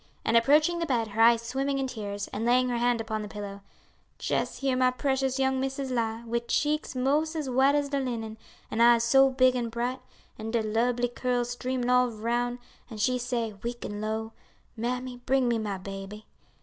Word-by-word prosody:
And 225 - +2
approaching 300 +8 +4
the 335 - -1
bed, 235 -5 0
her 215 +2 -1
eyes 230 0 +6
swimming 270 +3 -1
in 270 - 0
tears, 205 -5 -5
and 210 - -4
laying 250 +2 +3
her 240 -1 -1
hand 240 0 +2
upon 220 -1 -3
the 210 - -5
pillow, 200 -1 -7 0.6
"jes' - - -1
here 270 -2 0
my 255 0 +4
precious 265 0 0
young 265 0 +1
missus 270 0 -3
lie, 230 -2 -1
wid 235 +1 -2
cheeks 300 -1 0
'mos' 295 +5 +1
as 295 -5 -3
white 265 +3 +4
as 290 -1 0
de 280 0 0
linen, 225 -4 -4 0.3
an' 225 - 0
eyes 235 0 +6
so 270 +3 +5
big 255 -1 +3
an' 240 -2 -1
bright, 240 +3 -3 0.4
an' 220 +1 -5
de 225 -1 0
lubly 240 +3 +1
curls 245 0 -1
streamin' 250 0 -2
all 250 0 +4
roun', 240 +2 -1 0.3
an' 220 - -8
she 250 +4 +1
say, 235 -3 -2
weak 235 +1 -5
an' 205 0 -5
low, 220 +1 -3 0.4
'Mammy, 250 +2 -3
bring 255 +1 +1
me 235 -1 +1
my 205 -3 -3
baby.' 195 +2 -8
245 Hz, 200 wpm, -28 LUFS, 225-260 Hz, 0.6 s, eyes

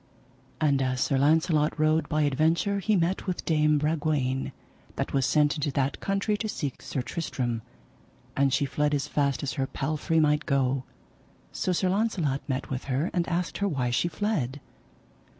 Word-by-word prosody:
And 140 -3 +2
as 130 -1 0
Sir 135 +2 +1
Launcelot 155 +1 +2
rode 155 0 +2
by 155 -1 +1
adventure 160 +8 +2
he 210 +2 +1
met 180 +2 0
with 185 - -3
Dame 150 -2 +3
Bragwaine 145 -3 0 0.4
that - - -3
was 135 -2 +2
sent 150 -1 +3
into 150 0 -1
that 135 0 0
country 195 +2 0
to 215 +1 -3
seek 145 -9 -4
Sir 130 - -3
Tristram, 125 -7 -3 0.7
and 135 0 +3
she 140 +2 +2
fled 145 +2 0
as 140 0 -2
fast 140 -2 0
as 135 -4 -2
her 135 +2 -1
palfrey 155 +4 -1
might 150 0 +2
go. 135 -2 +1 0.7
So 185 - -1
Sir 185 +1 +1
Launcelot 185 -9 0
met 130 0 -2
with 130 0 -3
her 140 +5 -1
and 175 -2 0
asked 175 +1 -2
her 200 - +1
why 130 -8 -1
she 120 - +1
fled. 170 - -2
150 Hz, 170 wpm, -27 LUFS, 135-170 Hz, 0.7 s, Dame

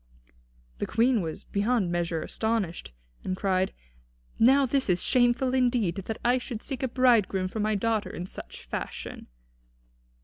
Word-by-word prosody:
The - - -2
Queen 235 0 +3
was 160 -2 -5
beyond 205 -2 0
measure 170 -2 -1
astonished, 220 - -2 0.3
and 185 0 -2
cried: 190 -1 +1 0.7
"Now 270 +4 +6
this 265 -2 0
is 180 -1 +2
shameful 250 +1 +2
indeed, 245 -8 +2
that 225 - -4
I 250 +1 +4
should 240 -3 -6
seek 270 -1 -4
a 260 - +1
bridegroom 230 -7 +3
for 220 - -5
my 215 0 +1
daughter 220 +1 0
in 175 - -6
such - - -9
fashion." - - -6
225 Hz, 145 wpm, -27 LUFS, 185-250 Hz, 0.7 s, Now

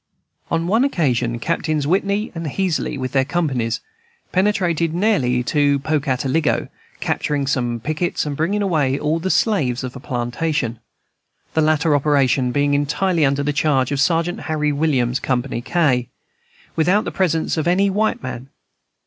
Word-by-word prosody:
On 165 0 0
one 220 +8 +3
occasion 125 - 0
Captains 155 +1 -1
Whitney 200 +6 0
and 165 -2 -5
Heasley, 175 -1 -1
with 130 -1 -3
their 135 -1 +3
companies, 130 -7 -1 0.5
penetrated 180 -4 +1
nearly 135 - +2
to 145 +2 +2
Pocataligo, 140 0 0 0.3
capturing 145 -2 -1
some 120 -4 -1
pickets 155 +8 -2
and 145 -1 -3
bringing 195 +8 0
away 150 -8 +1
all 155 +3 0
the 185 +3 -2
slaves 135 - +1
of 130 0 -6
a - - -7
plantation, 125 -1 -2 0.7
the 160 - +2
latter 155 0 +3
operation 135 -3 +2
being 145 +1 +1
entirely 160 +4 +1
under 140 0 +2
the 145 +1 0
charge 140 -3 +1
of 140 - -1
Sergeant 170 +3 +1
Harry 150 -1 +1
Williams 135 -5 +1
(Co. 130 -2 0
K), 125 0 0 0.7
without 180 +6 +3
the - - -3
presence 165 -4 0
of 160 0 -1
any 190 +3 +3
white 215 -3 0
man. 130 +1 -6
150 Hz, 150 wpm, -20 LUFS, 130-170 Hz, 0.7 s, one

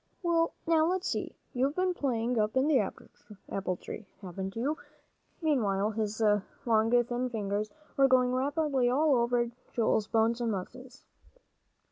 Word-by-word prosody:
"Well, 335 -1 +2
now 320 -1 +3
let's 370 +1 -1
see. - - -3 0.2
You've 270 +4 0
been 365 0 +1
playing 245 -6 0
up 215 +4 +1
in 265 +3 +3
the 295 -4 +4
apple 195 -2 -5
tree, 215 +2 -8 0.2
haven't 190 +1 -5
you?" 270 +7 0 0.7
Meanwhile, 215 -9 +1
his 215 0 -3 0.5
long 225 -1 +3
thin 245 +1 -2
fingers 210 -2 -2 0.3
were 275 0 +6
going 255 -1 +3
rapidly 275 -1 +1
all 290 +4 +3
over 240 -1 +1 0.2
Joel's 220 -2 +1
bones 225 +2 +2
and 230 -1 0
muscles. 255 +7 -7
245 Hz, 140 wpm, -30 LUFS, 215-275 Hz, 0.7 s, were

